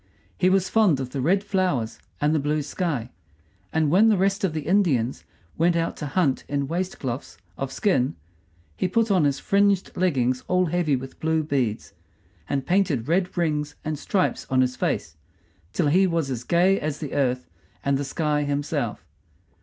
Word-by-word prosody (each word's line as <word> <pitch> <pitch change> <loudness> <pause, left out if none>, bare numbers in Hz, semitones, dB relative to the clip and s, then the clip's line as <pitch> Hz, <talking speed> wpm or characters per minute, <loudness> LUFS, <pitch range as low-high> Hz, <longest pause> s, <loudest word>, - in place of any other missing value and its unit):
He 185 - +3
was 190 0 +2
fond 205 -11 +3
of 130 -2 -4
the 135 - -3
red 190 +8 +2
flowers 180 - -1 0.2
and 150 +1 +2
the 155 - +2
blue 150 +1 0
sky; 145 - -3 0.6
and 155 -2 +1
when 210 +6 +6
the 215 - +3
rest 195 +2 +1
of 190 - +2
the 155 - -2
Indians 150 - +1 0.3
went 170 +1 +3
out 165 0 0
to 150 - -4
hunt 145 -3 +1
in 140 -1 -1
waistcloths 140 - -4 0.2
of 135 -1 -4
skin 135 - +1 0.6
he 180 - 0
put 225 +4 +1
on 180 -6 +4
his 140 -1 +1
fringed 200 -1 +1
leggings 130 -8 +1
all 180 0 +2
heavy 170 -3 +1
with 130 +1 -7
blue 160 0 +1
beads, 130 -8 -2 0.6
and 135 -1 -1
painted 175 - +1
red 180 +3 0
rings 150 -3 0
and 155 -2 -2
stripes 185 +3 0
on 130 0 +3
his 125 0 +1
face, 80 - -2 0.5
till 170 - 0
he 190 +5 +4
was 165 -6 -1
as 125 -2 -3
gay 180 +7 +3
as 150 -1 -3
the 150 -4 -6
earth 125 -2 0 0.4
and 140 0 +2
the - - -1
sky 150 +1 0
himself. 145 0 -2
155 Hz, 175 wpm, -24 LUFS, 135-185 Hz, 0.6 s, when